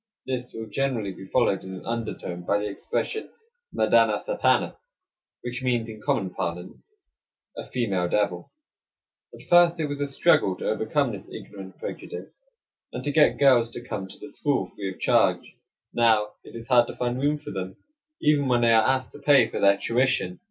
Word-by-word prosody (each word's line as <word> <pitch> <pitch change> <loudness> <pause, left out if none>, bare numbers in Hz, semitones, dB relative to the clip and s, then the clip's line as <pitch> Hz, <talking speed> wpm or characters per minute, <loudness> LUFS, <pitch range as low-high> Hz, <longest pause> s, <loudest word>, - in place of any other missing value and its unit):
This 125 -1 -4
will 115 0 -5
generally 110 -3 -2
be 95 - -11
followed 110 -4 +1
in 95 0 -7
an 95 - -10
undertone 110 -6 -4
by 100 +3 +1
the 105 0 -2
expression, 435 - -3 0.4
"Madana - - +3
satana," - - +1 0.7
which 125 +2 -4
means, 120 -3 0
in 110 -1 -9
common 95 -3 -1
parlance, 90 +1 -5 0.7
"a - - -6
female 100 -8 -1
devil." 95 -4 -1 0.8
At - - -14
first 175 -1 +5
it 155 - 0
was 145 -1 -4
a 145 - 0
struggle 135 - +3
to - - -5
overcome 115 +5 0
this 100 -3 -9
ignorant 95 -2 -10
prejudice, - - -8 0.5
and - - -6
to 145 - -1
get 150 +1 +4
girls 130 -5 +5
to 120 +1 -9
come 95 -6 -4
to - - -13
the - - -10
school 145 -1 -1
free 100 -2 -6
of - - -13
charge; - - +2 0.4
now 110 -3 +3
it - - -13
is 115 0 -8
hard 120 -2 +5
to - - -7
find 125 +1 -2
room 145 +2 +1
for 150 - -9
them 95 -1 -5 0.4
even 150 -2 +2
when 120 -1 +2
they 115 -1 +4
are 110 -1 +5
asked 130 -2 0
to - - -12
pay 140 -6 +5
for - - -4
their 100 0 +5
tuition. 115 -6 0
115 Hz, 185 wpm, -25 LUFS, 100-135 Hz, 0.8 s, first